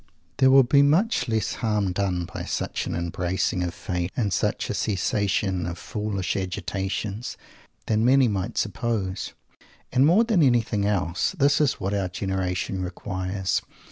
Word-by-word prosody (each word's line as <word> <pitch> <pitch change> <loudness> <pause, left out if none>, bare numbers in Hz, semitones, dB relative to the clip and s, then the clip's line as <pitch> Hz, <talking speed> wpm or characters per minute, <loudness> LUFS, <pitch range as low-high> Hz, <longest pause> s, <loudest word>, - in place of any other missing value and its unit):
There 130 -1 +5
will 135 0 +7
be 140 +3 +4
much 155 - +3
less 110 -1 0
harm 105 -4 +1
done 90 -2 -1
by - - -7
such - - -3
an - - -2
embracing 90 +2 -1
of 90 -1 -2
Fate, 90 -3 -3
and 105 -6 0
such - - 0
a - - -2
cessation 95 -2 0
of 85 0 -5
foolish 105 -3 -3
agitations, 95 +3 -3 0.5
than 110 0 +1
many 130 +1 +5
might 100 -3 -2
suppose. 100 -4 -2 0.6
And 130 - +4
more 175 +10 +5
than 220 -7 +2
anything 115 -6 +2
else, 90 - 0
this 145 0 +3
is 145 - +3
what 95 +2 -3
our 100 -2 0
generation 95 0 -2
requires! 95 +1 -2
100 Hz, 150 wpm, -25 LUFS, 95-120 Hz, 0.6 s, will